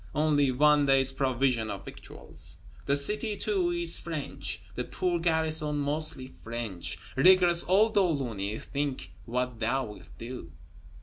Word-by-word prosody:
only 150 -3 +2
one 145 +2 +4
day's 135 -1 +4
provision 130 -4 0
of 100 -1 -6
victuals. - - -7 0.3
The 140 - +3
city, 210 +9 0
too, 195 -5 0
is 170 -1 -1
French, 140 - -4
the 125 - -3
poor 175 +5 -2
garrison 160 -2 +1
mostly 145 -2 +2
French. 100 -10 -5 0.2
Rigorous 175 +3 +5
old 215 +4 +4
De 200 - +4
Launay, 120 - -2
think 140 -11 -4
what 125 0 -3
thou 130 +4 0
wilt 105 -1 -12
do! 115 -7 -8
140 Hz, 135 wpm, -28 LUFS, 120-165 Hz, 0.3 s, Rigorous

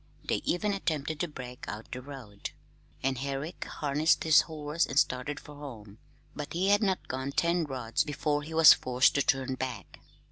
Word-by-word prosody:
They - - +1
even 205 +4 0
attempted 155 -5 -2
to 175 - 0
break 125 -5 -8
out 110 +2 -7
the 125 - -5
road, 125 -7 -8 0.5
and 130 -1 0
Herrick 140 +5 -4
harnessed 150 +2 +1
his 160 -2 +7
horse 155 0 -2
and 135 - -5
started 135 +2 +1
for 150 - -12
home; 115 -8 -10 0.4
but 150 -1 -6
he 185 +3 +1
had 205 0 +5
not 190 -3 0
gone 130 +2 -3
ten 170 +2 +2
rods 125 -5 -1
before 145 0 -1
he 160 +2 -7
was 160 -2 +10
forced 125 0 +2
to 140 - +2
turn 135 -1 +1
back. 130 -7 -5
145 Hz, 180 wpm, -29 LUFS, 130-155 Hz, 0.5 s, was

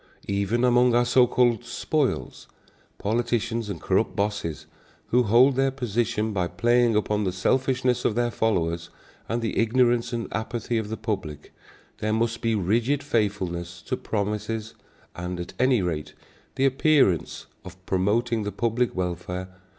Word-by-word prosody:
Even 100 +4 0
among 125 -1 +4
our 120 0 +4
so 125 0 +4
called 120 -1 +2
"spoils" 130 +3 -2 0.5
politicians 115 0 -1
and 95 -5 -4
corrupt - - 0
bosses, 100 -8 -2 0.4
who 125 - +4
hold 125 +4 +5
their 135 +1 +2
positions 115 -4 -1
by 90 -3 0
playing 120 +6 +2
upon 105 0 +1
the 95 - 0
selfishness 130 +6 +1
of 105 - +1
their 120 0 +1
followers 85 -7 -1 0.4
and 115 +1 -1
the 110 - -1
ignorance 120 0 +2
and 115 -1 -3
apathy 115 +1 -2
of 105 -1 -5
the 110 - -4
public, 95 -10 -5 0.5
there 110 0 -1
must 115 +1 0
be 115 -1 +1
rigid 115 +9 +1
faithfulness 95 -9 -2
to - - -2
promises, 105 +1 -3 0.4
and, 90 0 -5
at 85 - -6
any 125 -5 +3
rate, 75 -4 -3 0.4
the 135 0 +2
appearance 135 - +2 0.2
of 95 - -11
promoting 110 +5 +1
the 105 0 -3
public 115 +4 0
welfare. 90 0 -3
110 Hz, 145 wpm, -25 LUFS, 100-120 Hz, 0.5 s, hold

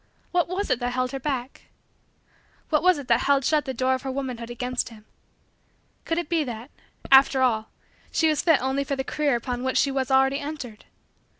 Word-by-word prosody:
What 350 -1 +2
was 370 -1 -2
it 250 - +2
that 245 0 -2
held 255 0 -1
her 270 - -4
back? 265 -2 -4 1.1
What 305 - +3
was 365 -1 +4
it 280 -3 -7
that 235 -1 +4
held 280 0 +2
shut 305 -1 +2
the 265 - -3
door 260 +2 +1
of 260 - -2
her 270 - -5
womanhood 255 -4 -4
against 250 +1 -3
him? 215 -2 -15 1.0
Could 330 - -1
it 345 - -2
be 330 -1 +1
that, 240 0 -7 0.4
after 265 0 +6
all, 220 -3 +1 0.4
she 320 - +2
was 310 -2 +1
fit 325 -5 +4
only 265 +1 0
for 275 0 -2
the 265 - -2
career 290 -1 0
upon 245 +1 -3
which 260 0 0
she 275 - +3
was 270 -1 -1
already 270 +1 +3
entered? 285 -7 -7
265 Hz, 205 wpm, -25 LUFS, 250-290 Hz, 1.1 s, after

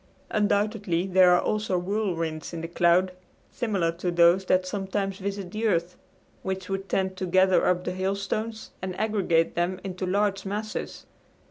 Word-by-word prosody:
Undoubtedly 205 -4 +1
there 185 -1 +5
are - - +3
also 210 -4 0
whirlwinds 175 -5 -2
in 165 - -4
the 165 - -4
cloud, 175 +2 +3 0.4
similar 200 -9 0
to 175 +2 -3
those 175 +2 +4
that 185 0 +2
sometimes 195 0 -3
visit 195 -2 -4
the 220 +2 -1
earth, 175 -3 0 0.5
which 190 0 -4
would 195 0 -3
tend 190 -1 0
to 185 0 -4
gather 185 +1 +4
up 180 0 +2
the 180 - -2
hailstones 200 +4 -3
and 185 -1 -5
aggregate 195 -7 +1
them 175 +2 -1
into 185 -1 -4
large 195 0 +1
masses. 210 +2 -5
190 Hz, 155 wpm, -26 LUFS, 180-200 Hz, 0.5 s, there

